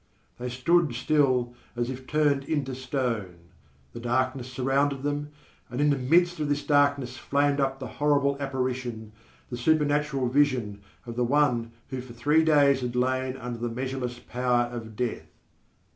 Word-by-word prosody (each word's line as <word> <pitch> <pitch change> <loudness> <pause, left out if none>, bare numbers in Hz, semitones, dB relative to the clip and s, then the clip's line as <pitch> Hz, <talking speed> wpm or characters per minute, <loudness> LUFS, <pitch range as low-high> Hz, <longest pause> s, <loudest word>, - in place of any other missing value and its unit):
_ - - -39
They 125 +1 -3
stood 140 +3 +2
still 130 -3 +2 0.2
as 120 +1 -1
if 130 0 -8
turned 145 -2 +2
into 140 -3 -1
stone. 125 -8 -2 0.6
The - - -7
darkness 130 +1 -1
surrounded 135 +1 0
them, 145 0 -2 0.4
and 125 +2 -5
in 145 0 +4
the - - +3
midst 170 +6 +2
of 150 -1 -1
this 145 0 0
darkness 140 -3 +2
flamed 140 +4 +1
up 135 -1 0
the 135 - -6 0.2
horrible 140 -1 +3
apparition, 130 -5 -3 0.4
the 120 - -3
supernatural 145 -1 +1
vision, 125 -7 +1 0.2
of 120 -1 -7
the 125 - +2
one 120 -3 +2 0.2
who 130 -1 -3
for 125 -1 -11
three 150 +6 +3
days 145 -4 +4
had 125 -1 -3
lain 130 +1 0
under 120 -2 -6
the 120 0 -2
measureless 125 0 -4
power 125 0 0
of 110 -2 -7
death. 125 0 -3
130 Hz, 160 wpm, -27 LUFS, 125-145 Hz, 0.6 s, in